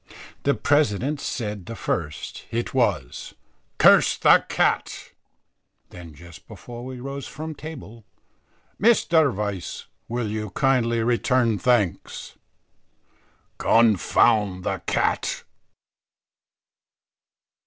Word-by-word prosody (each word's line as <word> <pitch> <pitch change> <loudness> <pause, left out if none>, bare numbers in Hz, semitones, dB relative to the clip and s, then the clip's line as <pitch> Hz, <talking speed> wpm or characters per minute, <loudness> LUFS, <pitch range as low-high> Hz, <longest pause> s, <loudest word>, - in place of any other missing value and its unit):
The 140 - +1
president 145 0 +1
said 105 -5 -4
the 115 - -6
first; 75 -7 -4
it 120 +1 -3
was, 100 - -1 0.4
"Curse - - +5
the - - +5
cat." - - -1 0.8
Then 85 -4 -11
just 85 +2 -14
before 120 0 -10
we 130 0 -7
rose 135 +1 -6
from 155 +2 -7
table, 135 -7 -10 0.8
"Mr. 170 - +4
Vice, 100 -4 -5 0.2
will 120 -1 -3
you 105 0 -4
kindly 120 +1 +1
return 120 -2 +1
thanks." 115 -9 -1 1.2
"Confound 105 -3 +3
the - - -2
cat." - - -1
115 Hz, 90 wpm, -23 LUFS, 100-135 Hz, 1.2 s, Curse